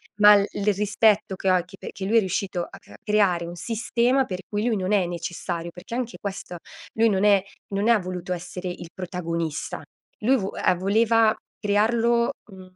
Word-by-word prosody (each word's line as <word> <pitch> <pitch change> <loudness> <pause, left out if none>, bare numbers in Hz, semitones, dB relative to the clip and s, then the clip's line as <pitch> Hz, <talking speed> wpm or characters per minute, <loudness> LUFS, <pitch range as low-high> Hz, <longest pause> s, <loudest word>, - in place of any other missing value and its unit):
Ma 210 0 +8
l 200 - +4
il 205 0 0
rispetto 210 0 +2
che 190 0 +1
ho, 185 - +5
e 175 - -1
che 195 - -13
perché 190 - -7
lui 220 +4 0
è - - +8
riuscito 185 -2 -2
a - - -13
cr - - -20
a - - -12
creare 195 -5 +2
un 170 - -7
sistema 240 +6 +1
per 185 -5 -5
cui 210 +2 -1
lui 225 -4 +1
non 190 +2 -1
è 190 -3 +3
necessario, 170 0 -4
perché 180 +6 -11
anche 240 -1 -3
questo, 190 -3 -6 0.4
lui 225 +1 +3
non 195 0 +1
è 200 -2 +5 0.3
non 205 +3 0
ha 230 -3 +5
voluto 180 -1 -4
essere 180 +1 -6
il 175 -1 -7
protagonista. 170 -3 -4 0.4
Lui 260 +5 +4
vo 195 -3 -3
uhm, 180 -1 +1
voleva 220 +3 +3 0.2
crearlo, 230 +4 +2 0.2
mhmm, 185 -1 -14
200 Hz, 200 wpm, -24 LUFS, 180-220 Hz, 0.4 s, Ma